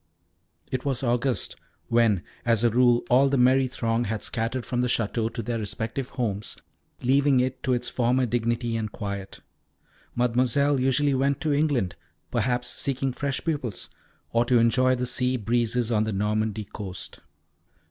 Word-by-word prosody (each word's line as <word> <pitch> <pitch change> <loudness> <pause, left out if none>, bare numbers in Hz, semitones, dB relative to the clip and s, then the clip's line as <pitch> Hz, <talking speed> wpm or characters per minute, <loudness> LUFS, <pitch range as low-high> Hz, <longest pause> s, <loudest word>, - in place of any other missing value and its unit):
It 130 -1 -2
was 135 -1 -1
August, 125 +1 0 0.3
when, 115 -6 +3 0.2
as 115 -1 +2
a 120 - +4
rule, 120 0 +4
all 135 +3 +4
the 140 - +1
merry 130 +1 +4
throng 115 -1 -1
had 110 0 -3
scattered 115 +2 -2
from 125 0 -1
the 125 - +1
Château 115 -1 0
to 115 - -5
their 115 +1 -2
respective 110 +5 -3
homes, 105 -5 -3 0.5
leaving 135 +1 +4
it 130 +1 -1
to 130 - +1
its 125 0 -1
former 125 +1 +1
dignity 120 0 -1
and 110 -2 -3
quiet. 100 -1 -6 0.7
Mademoiselle 125 +4 +2
usually 135 +2 +2
went 135 +1 +1
to 155 -2 +1
England, 140 - +1 0.4
perhaps 125 -1 0
seeking 135 -1 -2
fresh 140 0 -2
pupils, 135 - -3 0.4
or 115 0 +4
to 125 0 +3
enjoy 130 +3 +3
the 125 0 -2
sea 125 +1 +1
breezes 120 +1 0
on 110 -2 +2
the 110 0 -1
Normandy 105 +2 -1
coast. 95 -2 -6
120 Hz, 160 wpm, -26 LUFS, 115-130 Hz, 0.7 s, a